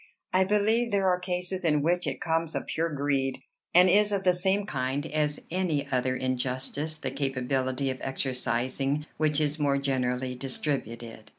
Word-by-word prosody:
I 185 0 +4
believe 215 +4 +2
there 200 -3 +2
are 180 0 +2
cases 180 +1 -2
in 150 -3 +2
which 175 +2 +1
it - - -2
comes 165 -2 -1
of - - -2
pure 165 +1 -1
greed, 140 -2 0 0.3
and 180 +1 +7
is 210 +3 +4
of 200 -1 0
the 180 -1 +5
same 190 +3 +1
kind 135 -3 -2
as 150 -1 -1
any 170 -5 0
other 130 0 +1
injustice 130 +4 -2
the 135 -4 -4
capability 135 0 -1
of 130 - -7
exercising 135 +2 -1
which 155 -1 +2
is 150 0 0
more 140 -2 +2
generally 130 -2 -1
distributed. 120 -4 -4
145 Hz, 165 wpm, -28 LUFS, 130-180 Hz, 0.3 s, and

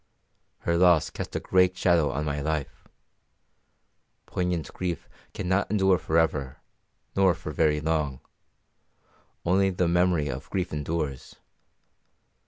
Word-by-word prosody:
Her 85 0 +1
loss 85 -4 +4
cast - - -6
a - - +1
great 90 0 +2
shadow 85 -4 +3
on 75 +2 -2
my 75 -1 -2
life. 75 -2 -3 1.4
Poignant 90 -3 -2
grief 90 -3 -4 0.2
cannot 95 +1 -1
endure 95 -3 +3
for 80 +1 0
ever, 70 -5 0 0.6
nor 95 -3 +4
for - - -7
very 75 -1 +2
long; 75 -4 -1 1.3
only 95 +3 +3
the 90 -1 0
memory 85 -3 +2
of - - -6
grief 90 -3 -2
endures. 75 -2 -3
85 Hz, 120 wpm, -26 LUFS, 75-90 Hz, 1.4 s, loss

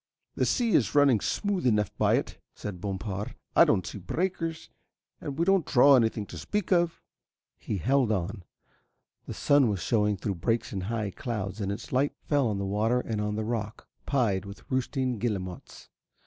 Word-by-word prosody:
"The - - 0
sea 240 -3 +1
is 125 - +2
running 140 -6 +5
smooth 195 - -1
enough 105 -3 +1
by - - +3
it," - - -3 0.2
said 95 -4 -7
Bompard. 100 +1 -4 0.2
"I - - +8
don't 95 - +2
see 105 - -6
breakers, 165 - -3 0.5
and 140 -1 -6
we 170 - +2
don't 195 -2 +4
draw 140 +1 +6
anything 110 -3 +1
to 85 -3 -9
speak 200 - -3
of." 175 -2 +2 0.6
He 105 - -3
held 125 - +2
on. 95 -2 -2 0.9
The - - -5
sun 145 -3 +4
was 100 -3 -1
shewing 105 +2 +1
through 100 +1 -3
breaks 115 +4 0
in 100 - -2
the 90 - -4
high 110 -1 -2
clouds 105 -2 -4
and 100 0 -1
its 100 - -6
light 135 +3 +2
fell 145 -4 +2
on 105 -2 -1
the 100 - -2
water 110 +5 +1
and 105 -3 -2
the 110 - -2
rock, 110 -1 -4 0.2
pied 110 -9 +1
with 100 0 -10
roosting 130 -2 -1
guillemots. 95 -6 -4
110 Hz, 180 wpm, -28 LUFS, 100-140 Hz, 0.9 s, I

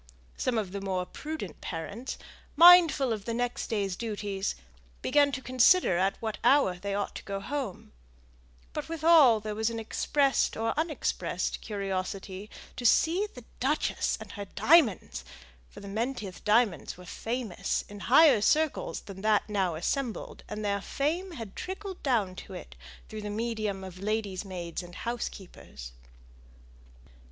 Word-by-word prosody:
Some 245 -2 -1
of 205 -4 -2
the 200 0 -5
more 185 -2 -1
prudent 300 - -7
parents, 200 +9 -5 0.4
mindful 330 -6 +7
of 210 -2 -6
the 230 - -2
next 245 0 -2
day's 200 -4 -1
duties, 205 -3 -3 0.5
began 285 -1 +4
to 260 0 -4
consider 255 - +4
at 195 +1 +1
what 220 -2 -4
hour 265 -11 +4
they 200 +1 -3
ought 200 0 -2
to - - -9
go 195 -1 -4
home; 250 -3 -5 0.8
but 300 +1 -5
with 325 -2 -5
all 300 -9 +7
there 215 0 -4
was 220 +2 0
an 230 - -5
expressed 275 +5 +1
or 225 +1 0
unexpressed 315 -1 -2
curiosity 195 -1 -4 0.3
to 250 - -5
see 335 - +3
the 250 - -10 0.2
duchess 285 +4 0
and - - -9
her 205 -1 -6
diamonds; 270 - +3 0.5
for - - -12
the 200 - -9
Menteith 215 -2 -4
diamonds 210 -5 +2
were 180 - -12
famous 225 -3 -3
in 205 0 -10
higher 265 0 +6
circles 310 +7 +1
than 195 -1 -10
that 215 0 +2
now 190 -5 0
assembled; 235 - -3
and 210 0 -4
their 200 -1 0
fame 335 - -2
had 225 -9 -8
trickled 380 0 -6
down 225 -9 +1
to - - -9
it - - -10 0.3
through 215 0 -7
the 210 - -5
medium 215 -3 -2
of 185 -1 -9
ladies' 205 -2 -2
maids 175 -4 -5
and 175 0 -12
housekeepers. 190 - -6
215 Hz, 150 wpm, -29 LUFS, 195-270 Hz, 0.8 s, mindful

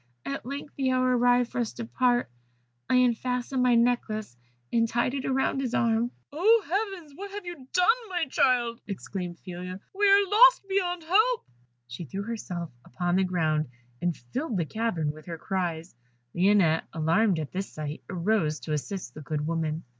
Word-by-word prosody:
At 140 - -4
length 280 +2 -6
the 265 -2 +1
hour 255 0 +2
arrived 245 0 +3
for - - -3
us 230 - -3
to 235 - -6
part, 245 +1 +1 0.6
I - - +3
unfastened 250 +1 +1
my 250 -1 +4
necklace, 230 - +1 0.4
and 230 -1 +3
tied 240 +2 0
it 270 -1 -2
round 270 0 +1
his 255 -2 -2
arm 230 0 +2
" - - -33
"Oh, 425 +8 +4
heavens! 385 -6 -2
what 400 +5 -7
have 405 -1 -7
you 335 -7 -8
done, 360 0 +3 0.2
my 350 -3 0
child?" 240 -3 +1
exclaimed 185 -3 -5
Phila. 180 0 -7
"We 410 +1 +3
are 400 0 +6
lost 455 +1 +6
beyond 360 -3 0
help." 435 +9 +3 0.4
She 125 +8 -7
threw 195 +7 -5
herself 185 -7 -5
upon 175 +7 -1
the 190 - +3
ground, 155 -4 0 0.3
and 175 -2 0
filled 230 - -4
the 170 - 0
cavern 180 -6 -1
with 155 +2 -14
her 165 -1 -5
cries, 175 -2 -3 0.4
Lionette, 180 -3 +3
alarmed 170 +5 +2
at 155 -2 -4
this 195 +1 -4
sight, 150 0 -6
arose 175 -4 0
to 155 - -3
assist 150 -2 -4
the 155 - -9
good 150 +1 -3
woman. 160 0 -2
230 Hz, 175 wpm, -27 LUFS, 175-270 Hz, 0.6 s, are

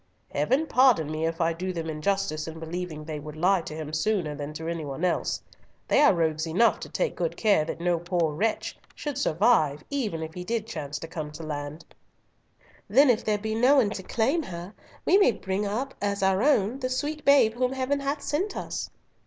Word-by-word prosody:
Heaven 255 - +2
pardon 250 - +4
me 155 +1 -1
if 165 0 -4
I 165 0 +2
do 185 +3 -3
them 165 -2 -4
injustice 155 0 -1
in 160 0 -7
believing 160 -1 -5
they 155 -1 -5
would 150 +1 -8
lie 180 +3 +3
to 155 - -7
him 155 -1 -6
sooner 175 -2 0
than 145 0 -5
to 160 +1 -6
any 165 -1 -3
one 140 +4 -3
else. 180 - -1 0.4
They - - +4
are 290 - +7
rogues 160 -1 0
enough 190 +9 +3
to - - -8
take - - -1
good - - -2
care 205 -8 +3
that 165 - -5
no 175 0 +1
poor 170 -2 0
wretch 215 +8 -1 0.2
should 295 -2 -4
survive 155 - +2
even 215 -13 -2
if 160 0 -7
he 180 - -6
did 225 +3 -2
chance 150 -8 -5
to 165 - -7
come 155 -2 -5
to 165 +2 -8
land." 150 0 -5 1.0
"Then 260 +5 +6
if 225 - -1
there 215 -1 +1
be 220 +1 -3
no 250 +6 +5
one 235 -7 +4
to 205 - -4
claim 240 - +1
her, 175 - -7 0.3
we 390 - +5
may 325 - +5
bring 190 +2 -2
up 255 +7 -2
as 200 -1 -1
our 190 0 +3
own 255 -3 +2
the 255 -1 -2
sweet 295 +4 -2
babe 280 -6 +5
whom 250 +2 0
Heaven 265 +2 0
hath 280 +1 -2
sent 360 +8 -1
us." - - -4
185 Hz, 210 wpm, -27 LUFS, 160-245 Hz, 1.0 s, are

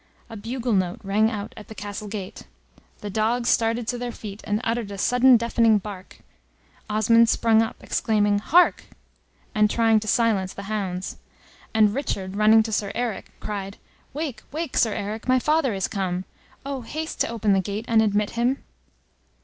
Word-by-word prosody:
A - - -7
bugle 235 +3 -3
note 185 -2 0
rang 210 +3 +2
out 210 -3 -5
at 215 - -11
the 220 - -10
castle 205 +1 -6
gate; 200 -3 -7 0.5
the 205 - -5
dogs 230 +4 +1
started 230 0 +1
to 245 0 -2
their 245 0 -3
feet, 210 -2 -9
and 210 0 0
uttered 230 -2 -1
a 200 - -7
sudden 250 +4 +5
deafening 230 -1 +3
bark; 195 -2 -9 0.7
Osmond 225 +2 +4
sprung 225 -1 +4
up, 225 - -2
exclaiming, 205 -2 +1
"Hark!" 345 +11 +3 0.7
and 210 0 +3
trying 225 -1 +3
to 215 - -8
silence 205 -4 +1
the 200 - -7
hounds; 195 -3 -4 0.5
and 215 -2 +4
Richard 195 -8 -3
running 215 +1 +5
to 220 - -5
Sir 205 -2 -1
Eric, 240 -4 -3
cried, 200 -1 -5 0.3
"Wake, 295 -3 -4
wake, 315 -1 -4
Sir 220 -3 +3
Eric, 210 +3 -5
my 255 0 +4
father 300 0 +2
is 190 - -1
come! 185 -3 -3 0.4
Oh, 275 -2 -4
haste 310 +7 -5
to - - +2
open 220 -3 +1
the 195 - +3
gate, 205 +4 -4
and 225 -1 +4
admit 210 -1 +1
him." 245 +3 0
220 Hz, 175 wpm, -24 LUFS, 205-235 Hz, 0.7 s, sudden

